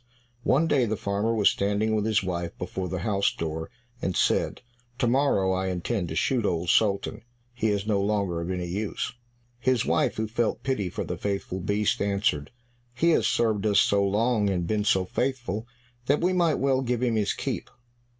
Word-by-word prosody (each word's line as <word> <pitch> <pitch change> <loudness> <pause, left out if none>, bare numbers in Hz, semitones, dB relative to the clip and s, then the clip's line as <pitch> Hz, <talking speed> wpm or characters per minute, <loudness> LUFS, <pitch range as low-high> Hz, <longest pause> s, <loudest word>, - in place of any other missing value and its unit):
One 135 +6 +3
day 140 -6 +3
the 110 0 -1
farmer 100 +3 -1
was 110 -3 +4
standing 105 +2 0
with 105 -1 +1
his 110 -2 +2
wife 85 -2 -3
before 90 0 -4
the 95 -1 -3
house 100 -2 +2
door, 80 0 -4 0.3
and 95 - -1
said, - - +1 0.3
"To 135 - +1
morrow 120 -7 +2
I 95 0 0
intend 90 +2 -2
to 80 - -5
shoot 125 +6 +1
Old 85 -3 -1
Sultan, 100 -3 +2 0.3
he 115 -2 -1
is 100 -1 0
no 105 -2 +1
longer 100 -4 0
of 85 - -4
any 90 -1 -2
use." 100 +7 -3 0.5
His 130 -2 +1
wife, - - +1
who 110 0 -1
felt 115 +1 -1
pity 120 -9 -1
for - - -4
the - - -4
faithful 100 -2 -3
beast, 105 +5 0
answered, 100 -8 0 0.5
"He 170 +6 +3
has - - +3
served 110 -4 +1
us 105 - +4
so 100 0 +3
long, 105 +1 +2
and 90 -3 -1
been 105 +3 0
so 95 -2 +3
faithful, 120 -2 -2 0.4
that 145 +2 +3
we 180 +2 +2
might 170 -4 +3
well 135 -1 +1
give 125 -1 -1
him 120 -2 +2
his 105 -2 +1
keep." - - -4
105 Hz, 190 wpm, -26 LUFS, 95-120 Hz, 0.5 s, was